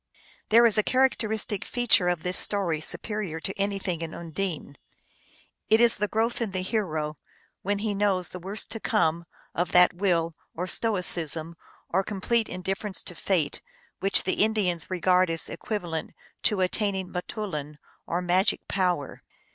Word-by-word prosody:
There 235 +2 +7
is 225 -2 +4
a - - +6
characteristic 220 -5 +1
feature 240 -7 +3
of 175 -3 0
this 180 0 +2
story 175 -7 +1
supe - - -1
rior 210 -7 -4
to 190 - -3
anything 195 -4 -2
in 165 0 -5
Undine. 165 -4 -5 0.9
It 220 - +5
is 235 -1 +5
the 210 +1 0
growth 225 +3 -1
in 215 -5 -2
the 185 -1 -2
hero, 160 -8 -2 0.4
when 205 +2 -1
he 210 0 -1
knows 195 -3 +1
the 180 - -8
worst 195 +4 -2
to 225 - -3
come, 170 -8 +1 0.3
of 175 +1 -2
that 180 0 +6
will, 170 -3 0 0.2
or 180 - -2
stoicism, 170 -6 +1 0.3
or 190 +3 +1
complete 215 +3 -1
indifference 190 +2 -3
to - - -7
fate, 170 -3 -1 0.4
which 195 +1 +6
the 190 - +1
Indians 195 -7 0
regard 185 0 +3
as 165 -1 -2
equivalent 175 -7 -4 0.3
to 205 -3 +2
attaining 190 0 -1
m 180 - 0
toulin, 150 -8 -5 0.3
or 175 +2 -1
magic 180 +3 +2
power. 180 -7 -1
185 Hz, 155 wpm, -26 LUFS, 170-210 Hz, 0.9 s, There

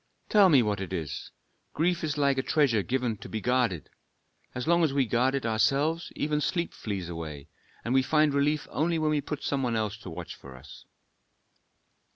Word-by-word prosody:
"Tell 205 -3 +6
me 140 -7 +6
what 105 -2 -1
it 95 - -5
is. 80 -6 -4 0.5
Grief 170 +2 +1
is 150 -2 -2
like 140 -2 +2
a - - +2
treasure 130 -6 +2
given 125 0 -1
to - - -10
be 110 - -3
guarded. 120 - 0 0.6
As 125 +3 -4
long 170 0 +4
as 155 - +2
we 135 -2 +3
guard 125 +3 +1
it 135 - -2
ourselves 140 +9 +1
even 150 0 -1
sleep 170 +2 -1
flees 100 -5 -4
away, 80 -4 -7 0.4
and 120 - 0
we 130 - +5
find 150 +2 +2
relief 145 +1 +1
only 165 +2 0
when 155 -1 +1
we 150 -1 +1
put 150 +1 -5
some 140 -1 -1
one 120 -3 0
else 110 -1 -1
to 100 - -9
watch 85 0 -7
for 65 -2 -13
us." 65 +2 -14
130 Hz, 195 wpm, -28 LUFS, 105-150 Hz, 0.6 s, Tell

